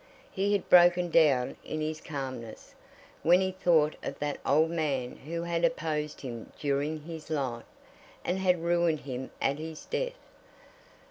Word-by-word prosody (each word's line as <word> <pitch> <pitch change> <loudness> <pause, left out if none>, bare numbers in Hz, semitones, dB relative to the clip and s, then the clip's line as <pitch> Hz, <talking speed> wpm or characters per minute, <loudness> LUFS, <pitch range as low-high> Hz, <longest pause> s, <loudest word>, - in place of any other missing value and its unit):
He 200 +2 0
had 200 - 0
broken 175 0 +6
down 140 -7 +4
in 155 - -4
his 155 0 -3
calmness, 130 -7 -6 0.5
when 175 +2 +5
he 190 0 0
thought 165 -5 +2
of - - -5
that 145 -1 -3
old 155 +4 +3
man 140 -7 -1
who 170 +4 -5
had 170 -1 -1
opposed 155 -11 -1
him 120 -4 -7
during 145 +2 -1
his 160 -1 -8
life, 130 -7 -2 0.6
and 180 +2 0
had 180 -3 +2
ruined 170 -2 +2
him 130 -1 -5
at 140 +2 0
his 160 0 -7
death. - - -2
155 Hz, 150 wpm, -29 LUFS, 140-175 Hz, 0.6 s, broken